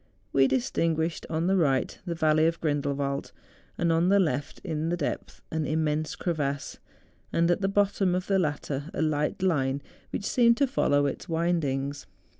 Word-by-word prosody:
We 135 -1 +5
distinguished, 165 -10 0
on 160 +1 -1
the 190 +2 +3
right, 135 -7 +1
the 170 - -2
Valley 155 0 +3
of 165 0 -1
Grrindel 145 -2 0
wald; 140 0 -2 0.5
on 170 +1 +2
the 200 +1 +5
left, 145 -6 -1
in 160 0 -2
the 175 - 0
depth, 150 - -4
an 155 -2 -1
immense 155 0 0
cre¬ 175 - -1
vasse, 140 -2 -3 0.5
and 170 +1 +2
at 175 - +1
the 195 - +2
bottom 195 -2 +2
of 180 0 -2
the 195 -1 +2
latter 150 -2 -2
a - - -1
light 150 +3 0
line 140 -7 +1 0.3
which 200 - -4
seemed 235 0 +4
to 280 - +4
follow 145 - +2
its 140 - -4
windings. 145 - -1
160 Hz, 175 wpm, -27 LUFS, 145-175 Hz, 0.5 s, We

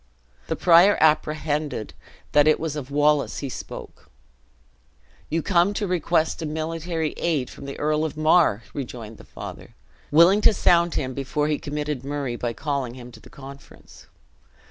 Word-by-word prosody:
The - - -1
prior 180 +3 +5
apprehended 150 -5 0 0.4
that 145 0 +4
it 155 - +4
was 160 -2 -3
of 140 -3 -6
Wallace 145 0 +2
he 140 - -4
spoke. - - -9 1.2
"You 165 +1 -1
come 190 +1 +2
to 210 - -1
request 170 -3 0
a 160 - -3
military 160 +1 -3
aid 150 -7 -1
from - - -11
the 140 - -7
Earl 150 +1 0
of 155 -1 -4
Mar!" 155 - +3
rejoined 120 -5 -7
the - - -12
father, - - -10 0.3
willing 170 +7 +5
to 215 - +5
sound 170 -2 +3
him, 130 -1 -2
before 150 +3 -2
he 150 - 0
committed 150 -2 -4
Murray, 140 -3 -3
by 120 0 -3
calling 135 -2 -3
him 125 -1 -11
to - - -14
the - - -16
conference. 140 0 -14
150 Hz, 160 wpm, -23 LUFS, 140-165 Hz, 1.2 s, prior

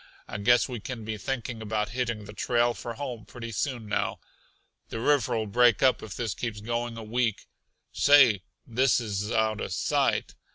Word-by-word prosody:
I - - -5
guess 120 +4 +4
we 125 -3 -5
can 115 0 -6
be 110 0 -3
thinking 120 -2 -4
about 105 -1 -1
hitting 120 -2 -2
the 105 - -10
trail 120 +2 +1
for 115 0 -6
home 125 -4 -5
pretty 115 0 -8
soon 120 -1 -2
now. 105 - -1 0.7
The 115 - -4
river'll 125 -4 +2
break 120 +2 +4
up 130 -1 +4
if 105 -3 -7
this 115 -5 -2
keeps 110 0 -4
going 120 +2 -3
a 115 - -6
week. 115 0 -1 0.5
Say, 135 -8 +6 0.2
this 125 0 +2
is 105 -2 -3
out 110 -1 +1
uh - - -3
sight! 85 - 0
115 Hz, 175 wpm, -27 LUFS, 105-125 Hz, 0.7 s, Say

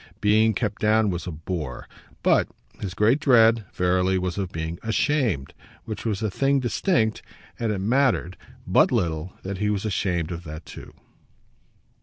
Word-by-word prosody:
Being 110 +1 +3
kept 105 -3 -2
down 110 -1 +3
was 90 0 -4
a - - -3
bore, 80 -5 -5 0.4
but - - +4 0.3
his 95 -3 -5
great 115 - +3
dread, 115 -6 +5
verily, 90 +1 +1
was 90 -1 -2
of 95 -2 -3
being 80 +1 -4
ashamed, 115 - 0 0.3
which 110 0 -6
was 110 -2 -1
a 110 - 0
thing 140 +6 +2
distinct; 120 - 0 0.4
and 115 -2 0
it 105 - -1
mattered 110 -3 +1 0.3
but - - +4
little 80 +1 -1
that 95 0 -5
he 105 0 +1
was 105 0 -1
ashamed 90 -5 -1
of 85 0 -6
that 80 +1 -8
too. - - -11
100 Hz, 160 wpm, -24 LUFS, 90-110 Hz, 0.4 s, dread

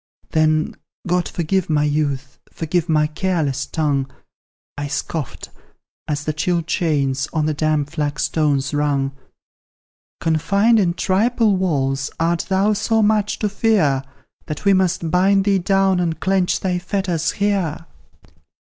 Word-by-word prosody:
Then, 155 0 +2 0.3
God 180 0 0
forgive 175 +2 -1
my 150 -1 +2
youth; 145 -2 -1
forgive 170 +1 -2
my 155 -1 +3
careless 150 -4 -1
tongue; 140 -4 -1 0.7
I 145 0 -4
scoffed, 150 0 -4 0.6
as 150 -1 -2
the 155 - -1
chill 170 +2 0
chains 140 -5 0
on 155 -2 +1
the 155 - 0
damp 150 -1 0
flagstones 150 -2 0
rung: 145 -2 0 1.1
"Confined 200 +8 +2
in 175 -4 +1
triple 215 +3 +2
walls, 140 -7 0
art 165 +1 0
thou 195 +3 +2
so 220 +1 +1
much 210 -1 +1
to 210 - 0
fear, 195 -10 +2 0.5
That 150 +6 -6
we 200 - +5
must 180 -3 +1
bind 195 +2 +3
thee 200 -2 +3
down 195 0 +2
and 165 -2 -1
clench 190 -1 +1
thy 180 -2 0
fetters 180 -3 -1
here?" 195 -6 -1
165 Hz, 130 wpm, -20 LUFS, 150-190 Hz, 1.1 s, we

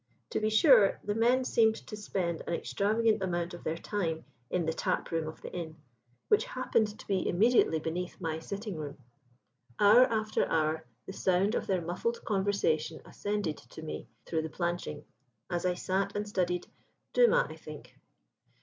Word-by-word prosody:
To - - 0
be 215 0 +1
sure, 220 -2 +6
the 205 - -1
men 245 +4 +3
seemed 220 -3 +4
to 215 - -7
spend 185 -5 -2
an 170 - 0
extravagant 215 +3 +1
amount 175 -2 -1
of 175 - -9
their 160 +1 -2
time 165 -4 -2 0.2
in 180 -2 0
the 160 - 0
tap - - -1
room 165 -1 -1
of 155 - -7
the - - -7
inn, 165 -3 -5 0.5
which 425 - +4
happened 225 -4 0
to - - -12
be 195 -2 0
immediately 205 -3 +4
beneath 170 +3 -4
my 160 -1 -2
sitting 200 +2 -5
room. 145 -2 -6 0.8
Hour 215 +5 +8
after 215 -1 0
hour 160 -2 0 0.2
the 190 - -7
sound 190 +3 +2
of - - -1
their 185 -3 0
muffled 180 +8 -2
conversation 190 -6 0
ascended 205 -6 -2
to 160 - -12
me 155 - -6 0.2
through 160 -1 -1
the 160 - -4
planching, 170 -3 -3 0.5
as 175 +1 0
I 180 - +1
sat 190 +2 -1
and 205 0 -2
studied 180 -3 -1 0.5
Dumas, - - +5
I - - -8
think. - - -11
185 Hz, 170 wpm, -30 LUFS, 165-215 Hz, 0.8 s, Hour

